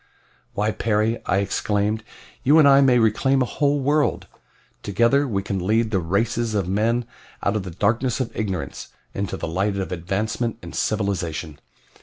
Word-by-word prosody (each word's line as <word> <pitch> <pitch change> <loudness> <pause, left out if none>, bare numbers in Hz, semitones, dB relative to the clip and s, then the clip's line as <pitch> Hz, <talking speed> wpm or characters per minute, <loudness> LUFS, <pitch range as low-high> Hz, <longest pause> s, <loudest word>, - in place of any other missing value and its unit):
"Why, 105 +2 +1
Perry," 110 +1 0
I 95 - +2
exclaimed, 105 +2 0 0.4
"you 145 +4 +5
and 155 -3 +7
I 140 0 +7
may 130 -3 +5
reclaim 130 +4 +3
a - - -1
whole 145 +3 0
world! 145 +2 +1 0.6
Together 120 +8 +2
we 100 -5 -1
can 95 -2 -3
lead 110 +1 +2
the 95 - +2
races 110 +6 -1
of 100 -4 0
men 115 +5 +1 0.4
out 100 - +1
of 105 - 0
the 95 - -7
darkness 115 +9 0
of 130 -3 -3
ignorance 95 -6 -4 0.3
into 100 -1 -3
the - - -4
light 100 +5 -1
of 95 - -3
advancement 105 +7 -2
and - - -9
civilization. 90 -7 -2
110 Hz, 165 wpm, -23 LUFS, 100-120 Hz, 0.6 s, and